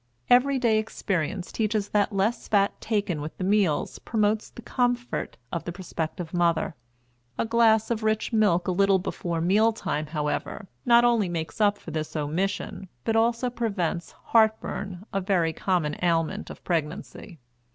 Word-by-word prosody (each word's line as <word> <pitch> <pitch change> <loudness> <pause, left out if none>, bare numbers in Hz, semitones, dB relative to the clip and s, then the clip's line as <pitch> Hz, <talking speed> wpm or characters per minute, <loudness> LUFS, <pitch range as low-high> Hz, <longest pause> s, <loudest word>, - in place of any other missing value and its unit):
Every 265 +3 +5
day 230 -4 +3
experience 190 -4 -2
teaches 215 -2 -1
that 210 +1 +2
less 200 +4 0
fat 200 -2 +2
taken 205 -8 -1
with 150 +2 -7
the - - -4
meals 190 -5 +1
promotes 215 -1 0
the 235 - -12
comfort 245 0 -1
of 170 - -3
the 175 - -4
prospective 170 -2 -5
mother. 170 -2 +1 0.6
A - - 0
glass 225 -1 +3
of 230 -1 0
rich 215 +2 0
milk 205 -6 +3
a - - +2
little 195 +1 +4
before 170 -2 -3
meal 210 +6 +4
time, 155 -8 -3
however, 150 +5 -3 0.2
not 240 0 +6
only 230 -6 +3
makes 165 +4 -4
up 205 -1 +4
for 165 - -9
this 155 0 -4
omission 180 +6 -2 0.2
but 225 - 0
also 235 +2 +2
prevents 200 -8 -2
"heart 220 -1 +3
burn," 195 -1 -6
a 195 - 0
very 180 -4 +1
common 165 -4 0
ailment 165 -2 0
of - - -10
pregnancy. 170 +2 -3
195 Hz, 160 wpm, -26 LUFS, 170-220 Hz, 0.6 s, not